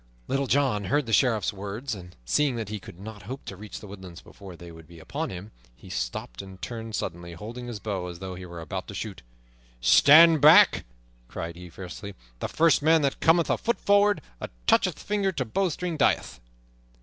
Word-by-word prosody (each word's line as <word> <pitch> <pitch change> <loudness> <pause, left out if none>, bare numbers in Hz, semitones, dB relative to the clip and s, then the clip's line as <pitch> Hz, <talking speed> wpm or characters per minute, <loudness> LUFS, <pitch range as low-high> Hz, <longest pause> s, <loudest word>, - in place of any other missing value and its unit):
Little 135 0 0
John 130 -8 +1
heard 145 +6 +1
the 115 - -4
Sheriff's 115 -4 +2
words, 105 +6 -5
and 90 -3 -10
seeing 140 - +1
that 110 -3 -4
he 105 0 -4
could 90 - -13
not 105 +1 -9
hope 135 +2 -7
to 95 - -7
reach 105 +2 -9
the - - -11
woodlands 95 -3 -10
before 95 -3 -12
they 85 0 -11
would 80 -1 -14
be 85 0 -14
upon 155 - -4
him, 95 +4 -8 0.2
he - - -13
stopped - - -4
and 95 -1 -12
turned 115 -1 -6
suddenly, 85 -1 -5
holding 115 +8 -8
his 115 -3 -6
bow 95 -5 -4
as 90 -1 -7
though 95 +1 -6
he 90 0 -8
were 85 -1 -8
about 95 +4 -5
to 100 - -8
shoot. 100 -3 -6 0.6
"Stand 155 - +7
back!" 170 +7 +7 0.4
cried 85 +7 -6
he 90 0 -10
fiercely. 95 +3 -9 0.2
"The - - -2
first 165 -2 +3
man 160 +1 +4
that 140 - 0
cometh 165 0 +3
a - - 0
foot 235 - -1
forward, 205 0 +3 0.2
or - - -3 0.2
toucheth - - +3
finger 205 -2 -1
to 130 -6 -2
bowstring, 175 - -2
dieth!" 140 - +1
105 Hz, 200 wpm, -26 LUFS, 90-145 Hz, 0.6 s, Stand